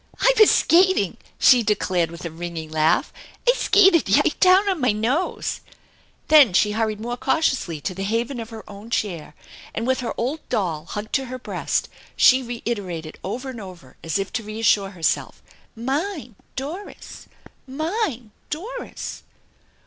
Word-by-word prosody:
" - - -29
I - - +5
vas 430 -3 +7
skating! 370 +3 +3
" - - -32
she 250 -3 +6
declared 185 -5 0
with 170 +1 -9
a 170 - -4
ringing 165 -1 -6
laugh. 155 0 +2 0.2
" - - -26
I - - +7
skated 390 -8 +4
yite - - +2
down 375 +2 +5
on 370 -6 0
mine 215 -4 +1
nose/' 265 +11 -1 0.7
Then 290 -10 +7
she 210 +3 +3
hurried 215 -1 -1
more 240 +2 -4
cautiously 255 - 0
to 185 - -3
the 190 - -7
haven 230 +5 -1
of 225 -1 -6
her 225 -2 -10
own 205 +2 -11
chair, 170 -10 -3 0.4
and 230 - -2
with 260 +1 +1
her 245 -2 -4
old 265 +7 -1
doll 165 -6 -1
hugged 210 +4 -6
to 270 -2 +1
her 255 0 -6
breast 255 - -2 0.3
she 260 +1 +6
reiterated 205 -10 -5
over 250 +7 -4
and 235 -3 -8
over 175 -9 -12
as 165 +3 -1
if 195 0 -4
to 225 - -1
reassure 210 -2 +1
herself: 175 -4 -2 0.2
" - - -36
Mine 270 - -3
I - - -31
Doris! 315 +10 -8 0.4
Mine! 305 - -3 0.2
Doris 455 +11 -6
230 Hz, 170 wpm, -22 LUFS, 195-290 Hz, 0.7 s, vas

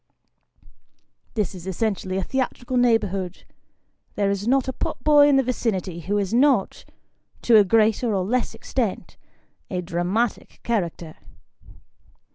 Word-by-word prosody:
This 210 -4 -1
is 185 -1 -10
essentially 190 -1 -2
a 190 - -1
theatrical 255 0 -3
neighbourhood. 205 -7 +1 0.7
There 200 -1 +1
is 200 +2 -3
not 265 +1 +2
a 260 - -2
pot 245 - -4
boy 295 -1 +6
in 285 - +4
the 270 - +4
vicinity 195 -8 -2
who 195 +5 -2
is 200 0 -2
not, 255 -4 +2 0.6
to 235 -2 +6
a 210 - +7
greater 220 +3 +2
or 190 -3 0
less 245 +5 -1
extent, - - -3 0.5
a 180 - -2
dramatic 180 +7 -2
character. 175 -7 -3
210 Hz, 130 wpm, -23 LUFS, 185-245 Hz, 0.7 s, a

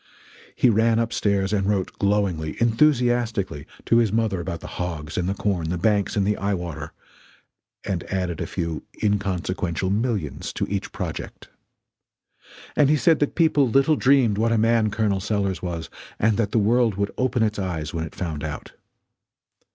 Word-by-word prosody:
He - - +3
ran 115 +1 +3
up 115 0 0
stairs 100 -2 +1
and 100 -2 +1
wrote 100 -3 -1
glowingly, 100 -6 0
enthusiastically, 120 - +1 0.2
to 115 - +4
his 115 -4 +3
mother 110 -5 0
about 85 -1 -5
the - - -10 0.2
hogs 80 -4 -4
and 90 +1 -1
the 100 - -1
corn, 90 -6 -1
the 90 - -1
banks 100 +2 +1
and 100 -2 +2
the 105 +1 +1
eye 100 0 0
water 85 -4 -6 0.9
and 95 -4 -2
added 90 -4 -2
a - - -2
few 85 -3 -3 0.2
inconsequential 95 -3 -1
millions 105 - -2
to - - -1
each 100 0 -3
project. - - -6 1.3
And 145 -2 +4
he 150 - +4
said 160 +1 +3
that 145 - 0
people 155 -6 +3
little 135 +5 +4
dreamed 130 -7 +3
what 115 +1 +2
a 115 - +3
man 115 0 +3
Col. 105 -2 0
Sellers 100 -1 -1
was, 85 -3 -5 0.3
and 110 0 +2
that 105 -3 +1
the - - +1
world 115 0 +3
would 100 0 -1
open 130 -2 +1
its 105 -1 -1
eyes 80 -5 -3
when 80 -1 -2
it 80 - -8
found 80 -5 -4
out. 75 -1 -6
100 Hz, 175 wpm, -23 LUFS, 90-115 Hz, 1.3 s, to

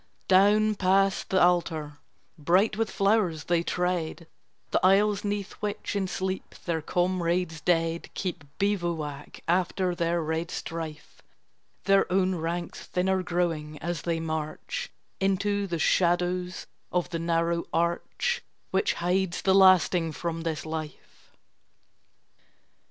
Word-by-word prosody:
Down 205 +3 +5
past 195 0 +2
the 190 - +3
altar, 160 -4 +1 0.4
bright 180 +7 +2
with 225 +1 0
flowers, 195 -6 +1
they 175 -1 +1
tread 180 -1 -2 0.5
The - - +1
aisles 200 +2 +4
'neath 205 -1 -2
which 210 0 -3
in 195 -2 0
sleep 190 +1 -4
their 165 -2 -1
comrades 175 -1 0
dead 165 0 0
Keep 180 -4 -3
bivouac 170 -8 -2
after 180 +1 +1
their 170 -1 0
red 160 +2 -2
strife, 160 -2 -6 0.6
Their 195 -1 +3
own 185 0 +2
ranks 170 0 -3
thinner 185 +1 +1
growing 165 -4 -2
as 170 0 -3
they 165 -1 -1
march 160 - -4 0.3
Into 200 +1 +1
the 170 -2 -2
shadows 180 +2 +1 0.3
of 180 0 -1
the 165 - -2
narrow 170 0 0
arch 170 - 0 0.3
Which 430 - +2
hides 180 0 0
the 190 - +4
lasting 185 -3 +5
from 165 +3 -3
this 160 -2 -3
life. 155 -1 -7
175 Hz, 120 wpm, -27 LUFS, 165-190 Hz, 0.6 s, Down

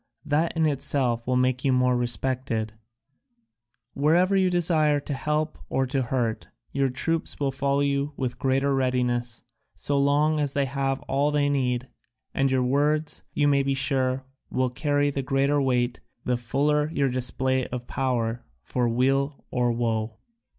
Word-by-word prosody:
That 155 +3 0
in 160 - +3
itself 130 -5 0
will 130 - +1
make 130 0 +1
you 135 - +3
more 125 0 +3
respected; 120 -2 -1 1.2
wherever 170 +7 +3
you 190 -1 +3
desire 160 -4 +2
to 145 +1 -5
help 150 +2 -2
or 135 - +1
to 135 +1 -1
hurt, 120 -3 -2 0.2
your 135 -1 +1
troops 165 +6 -2
will 140 -2 0
follow 140 +1 0
you 140 0 0
with 125 -2 -3
greater 135 +1 +1
readiness, 125 -3 0 0.3
so 140 -1 0
long 150 +2 +2
as 145 -2 -1
they 140 -1 +1
have 135 0 -1
all 140 +2 0
they 145 -1 +1
need, 130 -2 0 0.5
and 135 0 +2
your 130 -1 +2
words, 150 +4 +1
you 145 - +3
may 140 -1 +4
be 135 0 0
sure, 130 -1 0 0.2
will 130 -1 0
carry 145 +2 +1
the 140 - -2
greater 135 +2 +1
weight 125 -2 0 0.3
the 125 - +1
fuller 145 +5 +1
your 140 -4 +1
display 130 +1 0
of 125 -1 -6
power 120 -3 -1 0.2
for 120 -2 0
weal 135 +4 0
or 125 -1 +1
woe." 110 -2 -1
135 Hz, 155 wpm, -25 LUFS, 125-145 Hz, 1.2 s, may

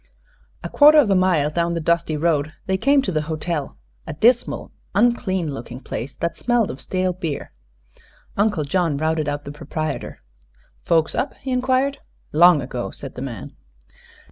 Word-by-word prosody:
A - - -3
quarter 300 +1 +6
of 255 -9 +5
a - - +4
mile 175 -6 +2
down 170 +1 0
the - - -1
dusty 170 -1 0
road 155 -1 0
they 190 - 0
came 275 +7 +3
to 190 - -2
the 155 -3 0
hotel, 155 - -3 0.3
a - - -4
dismal, 235 +10 +1 0.2
unclean 190 -8 +1
looking 125 -1 -8
place 130 0 -6
that 170 0 -2
smelled 240 -3 +1
of 130 - -9
stale 185 -1 -1
beer. 165 -5 -5 0.8
Uncle 205 -6 +1
John 160 0 0
routed 155 0 0
out 145 0 -4
the 140 - -6
proprietor. 155 - -5 0.6
"Folks 160 -2 +2
up?" - - -2
he 265 - -4
inquired. 260 +2 +1 0.3
"Long 165 -2 +6
ago," 125 -1 -4
said 135 - -8
the 125 - -8
man. 120 -7 -6
170 Hz, 165 wpm, -22 LUFS, 150-195 Hz, 0.8 s, quarter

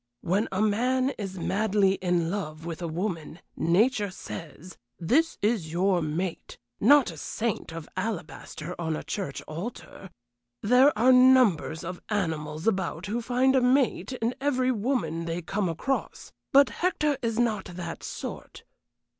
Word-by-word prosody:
When 195 +6 +1
a 190 +2 +1
man 255 +5 +2
is 195 -2 -5
madly 200 +1 +2
in 175 -3 0
love 160 -5 -5
with 170 0 -5
a 170 - -2
woman, 165 -1 -4 0.2
nature 205 +5 +2
says, 170 -1 -9 0.2
'This 295 - +2
is 205 -8 0
your 180 +1 +2
mate,' 165 +3 -4 0.2
not 275 -1 +5
a 160 - -11
saint 220 +4 -3
of 165 -1 -7
alabaster 180 -4 -5
on 160 -1 -1
a - - -5
church 190 -9 -4
altar. 190 +3 -8 0.5
There 250 +6 +6
are 245 +4 +5
numbers 250 -11 +4
of 180 +1 -6
animals 160 -6 -2
about 190 -5 -1
who 225 +4 -2
find 255 +3 +2
a 260 - +4
'mate' 260 +1 +2
in 235 -1 -1
every 260 -2 +1
woman 205 - -1
they 165 +1 -2
come 195 +2 -1
across. 260 - -3 0.2
But 280 -2 +6
Hector 300 -6 0
is 230 -2 -1
not 225 -5 +1
that 175 -2 -7
sort. - - -7
195 Hz, 145 wpm, -27 LUFS, 170-245 Hz, 0.5 s, There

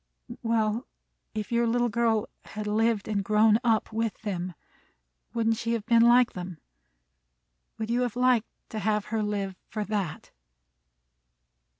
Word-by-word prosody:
"Well, 225 +1 0 0.5
if 215 +1 -4
your 235 0 +2
little 240 +1 +2
girl 225 -1 +1 0.2
had 215 0 -6
lived 215 0 +1
and 205 -2 0
grown 215 +2 +4
up 225 -2 +1
with 225 -1 -1
them, 180 -4 -3 0.8
wouldn't 225 -1 +2
she 230 0 -1
have 225 -3 -2
been 230 -1 +5
like 240 +1 +6
them? 180 -2 -6 1.2
Would 220 +1 -3
you 245 +1 +2
have 245 -3 -1
liked 250 -2 +3 0.2
to 220 - -4
have 210 0 0
her 220 - +1
live 200 -2 -2
for 215 -1 -2
that?" 200 -6 -3
220 Hz, 140 wpm, -27 LUFS, 210-230 Hz, 1.2 s, like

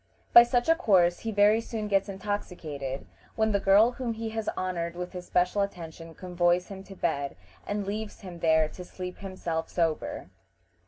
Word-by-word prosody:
By 235 - +12
such 240 0 +1
a 330 - +7
course 185 - +3
he 225 - -3
very 210 +2 +4
soon 220 -2 -4
gets 195 0 +1
intoxicated, 165 -9 -4 0.3
when 220 0 +2
the 200 - +2
girl 200 +5 +5
whom 245 -2 -3
he 225 0 -4
has 220 -1 -3
honored 170 -2 -2
with 180 0 -5
his 180 -1 -8
special 180 +3 +2
attention 165 -4 -6
convoys 175 0 +1
him 190 -1 -8
to 195 - -11
bed, 140 -6 -1 0.3
and 205 -1 -2
leaves 210 +1 -5
him 180 -4 -9
there 160 -1 +4
to 180 - -9
sleep 180 0 -7
himself 175 -4 -4
sober. 165 -3 -2
190 Hz, 175 wpm, -28 LUFS, 175-210 Hz, 0.3 s, By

